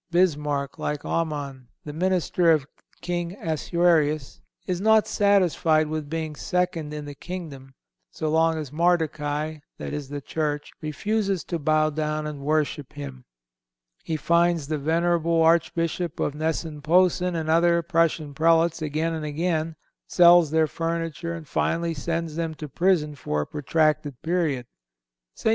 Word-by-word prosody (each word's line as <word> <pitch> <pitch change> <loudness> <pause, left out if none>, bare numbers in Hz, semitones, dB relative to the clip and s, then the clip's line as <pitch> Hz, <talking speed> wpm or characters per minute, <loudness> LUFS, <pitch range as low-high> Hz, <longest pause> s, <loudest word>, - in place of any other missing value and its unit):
Bismarck, 150 -6 0
like 150 -1 -3
Aman, 145 -6 -3 0.2
the 150 - -6
minister 180 0 +1
of 155 -4 +4 0.4
King 175 0 -3
Assuerus, 160 -3 +1 0.2
is 180 0 -2
not 220 0 +5
satisfied 170 -6 +2
with 155 -2 -4
being 160 -1 -3
second 180 -2 -1
in 150 -1 -6
the 145 - -7
kingdom 140 -6 -8 0.3
so 155 - -4
long 160 +1 +2
as 150 -4 -5
Mardochai, 155 -2 0 0.2
that - - -6
is 145 -2 -5
the 145 0 -4
Church, 150 +1 -3
refuses 195 +4 -1
to 170 - -4
bow 155 +1 +2
down 155 0 -2
and 150 -2 -5
worship 150 -1 -1
him. 65 -3 -8 0.8
He 160 - -2
fines 170 -1 +2
the 155 -1 -1
venerable 165 +2 +2
Archbishop 165 0 +1
of 145 - 0
Gnesen 155 0 -3
Posen 180 +3 +3
and 160 -1 -2
other 170 +1 +3
Prussian 165 -3 +1
Prelates 165 +2 +3
again 155 +2 -1
and 160 -1 -4
again, 160 +1 -1 0.3
sells 175 -2 +6
their 160 +1 +3
furniture 165 +1 -3
and 160 -3 -9
finally 170 +3 0
sends 165 +1 -3
them 165 -1 -2
to 150 - -7
prison 165 0 +1
for 75 - -2
a - - -3
protracted 150 -2 0
period. 160 -7 0 0.7
St. - - 0
160 Hz, 145 wpm, -25 LUFS, 150-170 Hz, 0.8 s, sells